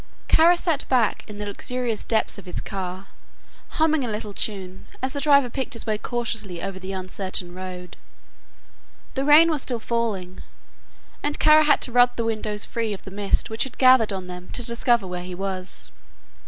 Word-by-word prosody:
Kara 340 Hz, +2 st, +5 dB
sat 330 Hz, -5 st, 0 dB
back 245 Hz, -5 st, +2 dB
in 210 Hz, -, -8 dB
the 210 Hz, -, -4 dB
luxurious 235 Hz, +2 st, -3 dB
depths 220 Hz, -2 st, 0 dB
of 190 Hz, -, -14 dB
his 180 Hz, -, -5 dB
car, 190 Hz, -1 st, -5 dB, 0.7 s
humming 315 Hz, -3 st, +3 dB
a 240 Hz, -, -2 dB
little 210 Hz, -1 st, -5 dB
tune, 190 Hz, -3 st, -4 dB
as 260 Hz, 0 st, -2 dB
the 285 Hz, -, -2 dB
driver 280 Hz, -3 st, +5 dB
picked 260 Hz, +2 st, -4 dB
his 230 Hz, -, -4 dB
way 215 Hz, -2 st, -1 dB
cautiously 220 Hz, -7 st, -3 dB
over 190 Hz, +2 st, -5 dB
the 190 Hz, +1 st, -6 dB
uncertain 185 Hz, -1 st, -2 dB
road. 180 Hz, -1 st, -8 dB, 1.2 s
The 270 Hz, -, -1 dB
rain 315 Hz, +3 st, +7 dB
was 300 Hz, -3 st, 0 dB
still 245 Hz, -3 st, -2 dB
falling, 215 Hz, -6 st, -3 dB, 0.8 s
and 290 Hz, 0 st, -1 dB
Kara 310 Hz, 0 st, +6 dB
had 295 Hz, -, +4 dB
to 250 Hz, -, -1 dB
rub 245 Hz, 0 st, +5 dB
the 230 Hz, -, -2 dB
windows 215 Hz, -2 st, -2 dB
free 225 Hz, -2 st, -2 dB
of 195 Hz, -, -8 dB
the 190 Hz, -, -9 dB
mist 200 Hz, +3 st, 0 dB
which 220 Hz, -, 0 dB
had 265 Hz, -, -7 dB
gathered 255 Hz, -4 st, +6 dB
on 190 Hz, -2 st, -4 dB
them 180 Hz, 0 st, -9 dB
to 245 Hz, -, 0 dB
discover 235 Hz, -2 st, +2 dB
where 180 Hz, -1 st, -5 dB
he 180 Hz, 0 st, -7 dB
was. 190 Hz, -1 st, -5 dB
220 Hz, 185 wpm, -24 LUFS, 190-255 Hz, 1.2 s, rain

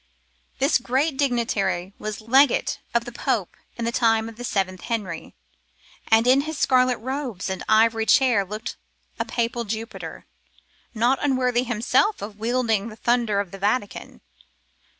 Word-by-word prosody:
This 275 Hz, +1 st, +3 dB
great 265 Hz, +5 st, 0 dB
dignitary 220 Hz, -9 st, 0 dB
was 215 Hz, 0 st, -5 dB
legate 260 Hz, +4 st, +3 dB
of 235 Hz, 0 st, 0 dB
the 240 Hz, -, -7 dB
Pope 235 Hz, -6 st, -2 dB, 0.2 s
in 235 Hz, -, -3 dB
the 235 Hz, -, 0 dB
time 225 Hz, -2 st, +2 dB
of 230 Hz, -, -9 dB
the 245 Hz, -, -8 dB
seventh 190 Hz, -5 st, -1 dB
Henry, 205 Hz, -8 st, -4 dB, 0.7 s
and 225 Hz, +1 st, +4 dB
in 260 Hz, +2 st, +5 dB
his 315 Hz, +1 st, -5 dB
scarlet 255 Hz, -2 st, +3 dB
robes 250 Hz, -6 st, -4 dB
and 190 Hz, -, -4 dB
ivory 225 Hz, 0 st, +3 dB
chair 250 Hz, -7 st, +4 dB
looked 210 Hz, +4 st, -6 dB, 0.4 s
a -, -, 0 dB
papal 235 Hz, 0 st, -2 dB
Jupiter, 225 Hz, +1 st, -6 dB, 0.7 s
not 240 Hz, +4 st, +2 dB
unworthy 255 Hz, -3 st, +1 dB
himself 245 Hz, -, +1 dB
of 205 Hz, 0 st, -8 dB
wielding 225 Hz, -2 st, 0 dB
the 215 Hz, -, -10 dB
thunder 235 Hz, -3 st, +1 dB
of 200 Hz, -3 st, -3 dB
the 195 Hz, -, -9 dB
Vatican. 205 Hz, +1 st, -2 dB
230 Hz, 150 wpm, -23 LUFS, 215-255 Hz, 0.7 s, in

